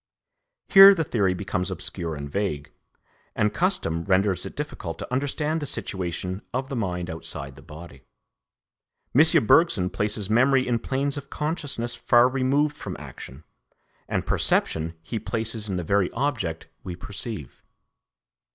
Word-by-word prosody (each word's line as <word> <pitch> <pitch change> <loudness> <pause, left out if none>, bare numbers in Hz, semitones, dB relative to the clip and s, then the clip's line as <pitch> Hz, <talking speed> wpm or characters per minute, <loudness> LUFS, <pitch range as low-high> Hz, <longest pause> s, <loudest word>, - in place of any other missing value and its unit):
Here 195 0 +10
the 165 - 0
theory 100 -9 0
becomes 90 -1 -2
obscure 90 -2 -4
and 70 -1 -6
vague, 75 -4 -3 0.6
and 105 0 +1
custom 170 - 0
renders 95 -1 +1
it - - -11
difficult 90 - -5
to - - -7
understand 150 +4 -1
the 145 - -4
situation 90 -1 -3
of 130 +1 -2
the 135 - -4
mind 90 -6 -2
outside 70 -5 -5
the 70 - -14
body. 75 -2 -12 1.1
M. 150 -3 +6
Bergson 105 - +4
places 105 -1 -1
memory 130 +4 +3
in 120 -2 +1
planes 140 +3 -1
of 140 - -8
consciousness 145 -6 -3
far 120 +1 +4
removed 135 +3 +1
from - - -7
action, 65 +5 -10 0.6
and - - -2
perception 80 +1 +1
he 115 +6 -4
places 110 -2 -3
in 95 - -2
the 90 - -2
very 100 +2 +1
object 115 - -2 0.2
we 90 - -6
perceive. 100 - -6
105 Hz, 140 wpm, -25 LUFS, 90-135 Hz, 1.1 s, Here